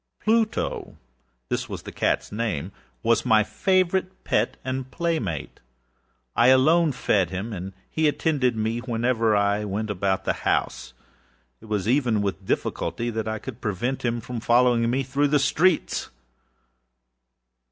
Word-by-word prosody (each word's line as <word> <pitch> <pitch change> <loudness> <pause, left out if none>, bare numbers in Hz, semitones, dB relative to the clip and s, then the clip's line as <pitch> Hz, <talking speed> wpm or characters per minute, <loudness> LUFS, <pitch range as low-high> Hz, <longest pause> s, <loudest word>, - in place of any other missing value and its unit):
Plutoâthis 65 - -2
was - - -6
the - - -8
catâs - - 0
nameâwas 110 +2 -2
my 110 -1 +4
favorite 185 - 0
pet 105 +3 0
and 130 0 -3
playmate. 160 - -2 0.8
I 115 +2 +5
alone 155 +5 +5
fed 100 -8 +1
him, 100 +5 -4
and 95 0 -6
he 160 -1 +1
attended 145 -5 +1
me 110 +2 -1
wherever 115 -2 +1
I 100 +1 +2
went 105 +1 -3
about 95 -1 -1
the - - +2
house. 65 0 -1 0.7
It - - -13
was 105 -2 -2
even 120 -5 +2
with 95 -1 -3
difficulty 120 0 -1
that 110 -1 -3
I 110 0 -2
could 125 +2 -9
prevent 120 +5 -2
him 120 -1 -1
from 120 +1 -5
following 120 0 +3
me 130 +3 +1
through 140 +3 +1
the 145 +1 +3
streets. 155 +5 +1
115 Hz, 135 wpm, -24 LUFS, 105-135 Hz, 0.8 s, I